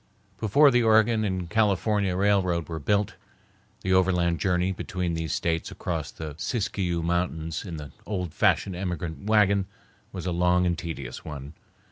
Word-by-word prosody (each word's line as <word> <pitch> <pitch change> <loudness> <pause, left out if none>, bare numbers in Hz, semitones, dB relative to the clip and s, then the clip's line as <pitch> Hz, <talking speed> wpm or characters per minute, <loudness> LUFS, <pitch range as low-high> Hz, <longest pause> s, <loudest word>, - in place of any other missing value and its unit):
Before 140 +7 +5
the 120 -1 +4
Oregon 110 0 +4
and 95 -4 -2
California 105 -1 +1
railroad 95 -4 +2
was 80 -2 -5
built, 100 +5 +1 0.7
the 95 - 0
overland 90 -2 +2
journey 90 -1 +1
between 90 -2 -3
these 80 -2 -3
States 85 -1 -1
across 80 -4 -4
the 80 -2 -7
Siskiyou 95 -4 -1
Mountains 80 -2 -1
in 85 -5 -6
the 75 -2 -8 0.2
old 90 -6 -3
fashioned 95 - +2
emigrant 90 -2 -4
wagon 100 -3 +3 0.4
was 90 -2 -6
a 90 - 0
long 90 +1 +3
and 85 -1 +1
tedious 75 -7 -6
one. 70 -1 -7
90 Hz, 150 wpm, -26 LUFS, 85-100 Hz, 0.7 s, Before